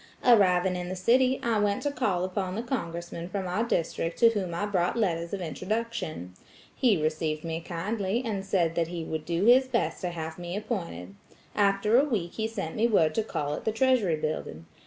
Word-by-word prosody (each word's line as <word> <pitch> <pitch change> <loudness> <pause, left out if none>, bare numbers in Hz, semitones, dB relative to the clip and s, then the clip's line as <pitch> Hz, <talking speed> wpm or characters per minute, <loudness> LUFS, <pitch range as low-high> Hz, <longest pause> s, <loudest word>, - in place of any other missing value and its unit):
Arriving 190 -6 +5
in 180 0 -4
the 185 - -3
city, 255 +7 +3
I 230 -2 +1
went 205 -1 +1
to 290 - 0
call 210 -10 0
upon 185 0 -2
the 225 - -3
congressman 170 -8 -4
from 195 0 -3
our 185 +6 0
district 165 -5 -1
to 230 - +6
whom 200 -6 -2
I 170 +5 -2
brought 185 0 0
letters 170 -6 0
of 200 - -3
introduction. 185 - -3 0.4
He 230 -9 +3
received 155 0 -1
me 165 0 -3
kindly, 195 +6 -2
and 205 -4 -2
said 180 -4 +1
that 165 -1 0
he 170 -1 -5
would 160 -1 -4
do 170 +3 0
his 255 +3 +6
best 235 -3 -1
to 180 - -1
have 160 -1 -6
me 175 +2 -4
appointed. 170 - -4 0.4
After 205 +3 +3
a - - +4
week 185 -8 -1
he 220 0 -1
sent 195 -8 -5
me 225 +2 +3
word 165 -9 +3
to 220 - +1
call 145 -9 -3
at - - -5
the 220 - +1
Treasury 225 -7 +2
Building. 155 - -4
185 Hz, 200 wpm, -28 LUFS, 170-220 Hz, 0.4 s, to